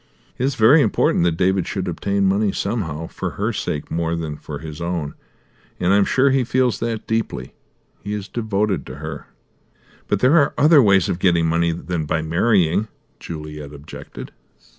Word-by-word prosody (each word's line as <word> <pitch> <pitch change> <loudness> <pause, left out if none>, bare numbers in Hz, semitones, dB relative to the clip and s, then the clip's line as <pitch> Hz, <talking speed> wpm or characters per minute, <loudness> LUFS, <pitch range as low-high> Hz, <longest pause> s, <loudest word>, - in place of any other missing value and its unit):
It 125 - +1
is 135 -1 0
very 125 +7 +6
important 105 -7 +2
that 85 -2 +1
David 95 0 +1
should 95 -2 -3
obtain 100 +3 -1
money 100 +2 +2
somehow, 85 -8 -3
for - - -5
her - - -1
sake 75 - -4
more 85 0 -1
than 80 -2 -4
for 75 0 -7
his 75 +1 -8
own, 85 -4 -3 0.7
and 90 +2 +2
I'm 100 0 +4
sure 135 +1 +3
he 135 -1 +2
feels 125 -3 +1
that 115 -1 -3
deeply. 110 - -3 0.5
He 105 0 -5
is 105 -1 -4
devoted 105 -4 -1
to - - -7
her." 75 0 -7 0.8
"But 105 - +1
there 140 +6 +5
are 140 - +1
other 150 0 +6
ways 100 -6 +4
of 85 - -2
getting 85 -3 +3
money 85 +1 +1
than 85 -1 -3
by 80 +2 0
marrying," 90 +3 +2 0.3
Juliet 75 -3 -8
objected. 75 +3 -10
95 Hz, 175 wpm, -21 LUFS, 80-110 Hz, 0.8 s, very